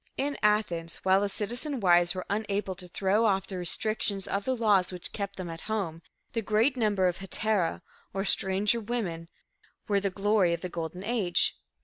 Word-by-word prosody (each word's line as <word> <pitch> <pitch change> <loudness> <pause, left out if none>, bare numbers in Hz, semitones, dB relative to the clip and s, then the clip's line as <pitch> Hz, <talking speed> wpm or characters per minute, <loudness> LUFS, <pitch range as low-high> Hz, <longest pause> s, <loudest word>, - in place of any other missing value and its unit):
In 285 +1 -1
Athens, 210 -6 +1
while 190 +1 +4
the 205 - 0
citizen 245 +8 -1
wives 175 -2 +4
were 185 - -4
unable 205 -2 -2
to 180 0 -10
throw 195 +5 +1
off 195 -2 +1
the 190 -2 -6
restrictions 200 +2 +1
of 200 0 -2
the 260 - 0
laws 205 -6 +3
which 180 -1 -5
kept 200 -1 -4
them 185 -2 -6
at 165 -1 -7
home, 180 -7 -2 0.3
the 230 - 0
great 225 +6 +2
number 205 -6 +2
of 175 - -1
hetera, 195 -2 -1 0.3
or 195 +1 -2
stranger 200 +4 +2
women, 205 -8 -3 0.6
were 200 -1 +2
the 195 0 -1
glory 195 -2 +2
of 170 - -11
the 180 - -4
"Golden 170 +2 -5
Age." 205 -5 +2
195 Hz, 185 wpm, -28 LUFS, 180-215 Hz, 0.6 s, while